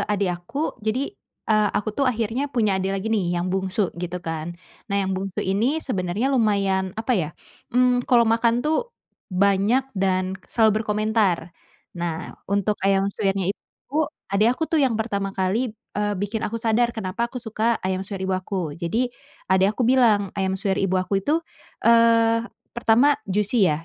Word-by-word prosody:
adik 200 -3 +1
aku. 175 - -3
Jadi, 240 - -1 0.3
eee, 215 -1 +3
aku 210 +1 -1
tuh 275 +4 +1
akhirnya 235 +4 -1
punya 215 -8 +1
adik 190 - -1
lagi 195 +2 -4
nih, 180 -5 0
yang 180 +1 -1
bungsu 190 +1 -1
gitu 180 0 -3
kan. 165 +1 -4 0.3
Nah 200 - 0
yang 190 - -1
bungsu 190 0 -3
ini 215 +10 +1
sebenarnya 205 +3 -1
lumayan, 195 -6 +1
apa 225 +3 -1
ya, 180 -10 +1 0.4
mmm, 250 0 +2
kalau 240 -2 +5
makan 230 +1 +2
tuh 315 +11 0 0.4
banyak 200 +6 +2
dan 190 -1 0
selalu 220 -2 +3
berkomentar. 210 -5 0 0.4
Nah, 170 -2 -4 0.2
untuk 200 +1 +1
ayam 195 0 +2
suwirnya 195 -2 0
itu, 270 - -22 0.4
adik 210 +3 +4
aku - - -4
tuh 320 - +4
yang 260 -5 +2
pertama 200 -3 -2
kali, 215 +5 0 0.2
eee, 205 0 0
bikin 205 +4 -2
aku 230 0 -2
sadar 230 +1 +2
kenapa 220 +3 -2
aku 255 - -10
suka 225 -1 0
ayam 185 0 0
suwir 190 0 -5
ibu 190 - -1
aku. 185 -4 -2
Jadi 220 +10 -1 0.4
adik 190 +1 +4
aku 250 - +1
bilang, 225 -6 +3
ayam 190 -1 -1
suwir 195 0 -1
ibu 190 -1 +1
aku 185 +2 0
itu, 315 - 0 0.4
eee, 230 0 +5 0.3
pertama 240 +5 +3
juicy 205 +1 +2
ya, 155 +1 -2
205 Hz, 165 wpm, -23 LUFS, 190-230 Hz, 0.4 s, kalau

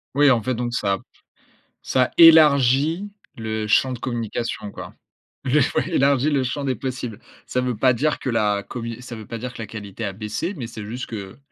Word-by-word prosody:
Oui, 145 -1 +6
en 120 - +3
fait 130 +4 -1
donc 120 0 -3
ça 100 -4 0 0.8
ça 130 -1 +1
élargit 155 +2 +6 0.3
le 110 -1 -3
champ 130 +4 +3
de 120 - -7
communication, 115 -3 -3
quoi. - - -9 0.5
Le 135 +3 +3 0.2
ouais, - - +1
élargit 140 +1 +3
le 140 -3 +1
champ 140 +3 -3
des 130 -1 0
possibles. 125 -3 -5 0.3
Ça 125 - -1
veut 125 -3 -2
pas 130 +3 +4
dire 150 +6 0
que - - -3
la 105 -3 +1
commu 115 -1 -6
ça 125 -1 -8
veut 110 -1 -9
pas 115 - -5
dire 125 +2 -6
que - - -8
la 110 - -6
qualité 105 0 -8
a 100 - -3
baissé, 110 - -4
mais 125 -8 -5
c'est 110 -2 -8
juste 120 +4 -5
que, 100 -4 -7
120 Hz, 205 wpm, -22 LUFS, 110-135 Hz, 0.8 s, Oui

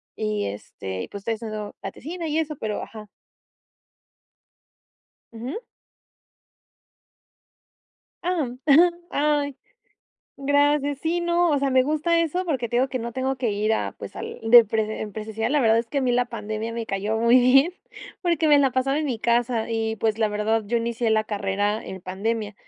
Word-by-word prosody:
y 215 -1 -2
este, 95 -2 -6
y - - -7
pues, 200 - -8
estoy 225 - -1
haciendo 215 -2 -6
la - - -5
tesina, 335 +4 -6
y 305 0 -1
eso 305 -1 -2
pero, 215 -1 -3
ajá. 215 -2 -10 2.2
Ujú. 245 - -5 2.6
Ah. 340 -7 0 0.2
Ajá. 320 +5 +7 0.2
Ay, 290 -2 0 0.8
gracias. 285 0 +2
Sí, 340 +1 0
no, 345 0 +2
o 290 - +2
sea, 275 0 0
me 260 0 +5
gusta 310 +4 +1
eso 335 +3 -1
porque 265 -9 -1
te 240 - -1
digo 260 +2 +2
que 255 - -3
no 235 0 -5
tengo 265 +2 -1
que 245 -3 -1
ir 210 +2 0
a - - -1
pues, - - -9
al - - -6
de 240 -1 +10
prese 220 0 -1
en 210 -1 -5
presencial. 220 +3 -3
La 295 - +3
verdad 225 -1 +4
es 230 - -2
que 285 - -1
a - - +1
mí 250 - +1
la 245 0 +2
pandemia 220 -1 -5
me 230 0 -3
cayó 205 +3 -2
muy 235 +2 +5
bien, 270 +7 +5 0.5
porque 335 -3 +1
me 290 -1 +7
la 275 -2 +3
pasaba 265 +3 0
en 310 - -1
mi 250 -5 -2
casa, 235 0 +1
y 225 -1 -1
pues, 220 0 0
la 220 -1 +2
verdad 210 +2 0
yo 235 - 0
inicié 235 0 -1
la 215 0 +2
carrera 205 +1 -1
en 190 - -7
pandemia. 210 +3 -3
235 Hz, 180 wpm, -24 LUFS, 220-285 Hz, 2.6 s, de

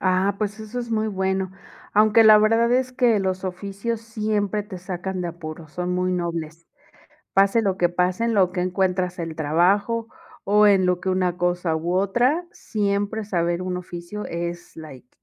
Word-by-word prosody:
Ah, 185 +1 +2
pues 210 0 -3
eso 220 +3 -6
es 240 -1 -5
muy 220 -1 0
bueno. 190 -1 -1 0.4
Aunque 215 +2 +6
la 215 -1 +9
verdad 225 +2 +3
es 255 0 +1
que 245 -4 +3
los 190 -1 -2
oficios 200 +5 -4
siempre 215 -2 -1
te 200 -3 -9
sacan 185 +1 -5
de 175 - -2
apuros, 160 -2 -9
son 180 0 -2
muy 180 0 0
nobles. 170 -2 -4 0.7
Pase 195 +4 +4
lo 195 -3 0
que 175 -2 +2
pase, 180 +4 0
en 230 -1 +1
lo 185 -3 +3
que 180 - -2
encuentras 180 0 0
el 165 -2 -4
trabajo 190 +9 +1 0.4
o 210 +1 +5
en 195 -2 +4
lo 180 -1 +1
que 190 - -4
una 185 -1 0
cosa 175 -2 0
u 170 +3 -2
otra, 240 - +1
siempre 205 0 -2
saber 175 -3 -1
un 185 0 -3
oficio 180 +3 -7
es 170 +1 -5
like, 145 -6 -11
190 Hz, 175 wpm, -23 LUFS, 175-210 Hz, 0.7 s, la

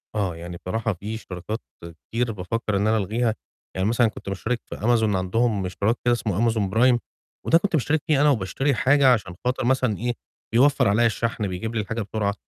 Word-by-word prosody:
آه، 95 -5 -1
يعني 85 +1 -7
بصراحة 110 +4 -2
فيه 105 +5 -6
اشتراكات 105 +1 -6 0.5
كتير 120 +1 0
بافكَّر 105 +2 -3
إن 100 - +1
أنا 110 +1 +3
ألغيها، 110 +3 0 0.4
يعني 95 +1 0
مثلًا 120 +1 +3
كنت 105 - -7
مُشترِك 110 +5 -2
في - - -7
Amazon 110 -2 +2
عندهم 100 +2 0
اشتراك 100 +5 0
كده 120 - +4
اسمه 115 0 0
Amazon 100 -3 -1
Prime، 125 +2 +5 0.5
وده 165 - +6
كنت 175 +1 -1
مُشترِك 155 +2 +1
فيه 150 -3 +3
أنا 150 - +5
وباشتري 135 +4 0
حاجة 135 0 +5
عشان 95 -6 -3
خاطر 125 0 0
مثلًا 130 -4 +1
إيه، 120 +2 -1 0.4
بيوفَّر 140 +2 +4
عليّا 110 +4 +3
الشَحْن، 115 -1 -1
بيجيب 95 +5 -4
لي 110 - +1
الحاجة 115 +3 -4
بسرعة. 105 0 -1
110 Hz, 190 wpm, -24 LUFS, 100-120 Hz, 0.5 s, وده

